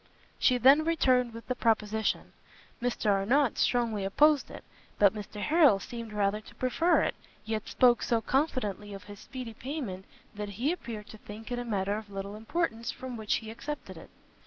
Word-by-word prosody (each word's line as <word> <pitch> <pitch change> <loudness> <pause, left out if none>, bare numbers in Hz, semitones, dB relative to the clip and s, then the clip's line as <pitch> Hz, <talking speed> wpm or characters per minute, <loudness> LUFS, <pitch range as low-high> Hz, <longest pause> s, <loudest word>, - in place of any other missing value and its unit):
She 255 - +4
then 270 +5 +6
returned 255 -7 +2
with 230 0 -10
the 255 - 0
proposition. 220 -2 0 0.5
Mr 240 -3 +1
Arnott 230 +7 +2
strongly 230 -5 +1
opposed 290 +9 +3
it, - - -10 0.3
but 200 -1 +5
Mr 210 0 -7
Harrel 300 - +5
seemed 230 +2 -7
rather 210 0 0
to - - -16
prefer 325 +7 +2
it, - - 0 0.3
yet 220 -1 -3
spoke 245 -2 +4
so 230 - +1
confidently 225 -7 -1
of 195 - -10
his 205 -1 -11
speedy 255 -4 -7
payment, 230 -7 -5 0.3
that 210 -1 -5
he 235 - -1
appeared 230 -11 -6
to 215 - -11
think 220 +4 -10
it 245 - -1
a - - -3
matter 200 -2 -1
of 215 -2 -13
little 200 +1 -6
importance 230 0 -2
from 260 -1 -6
which 220 -2 0
he 220 -1 -5
accepted 295 +6 -6
it. - - -12
225 Hz, 180 wpm, -29 LUFS, 210-255 Hz, 0.5 s, then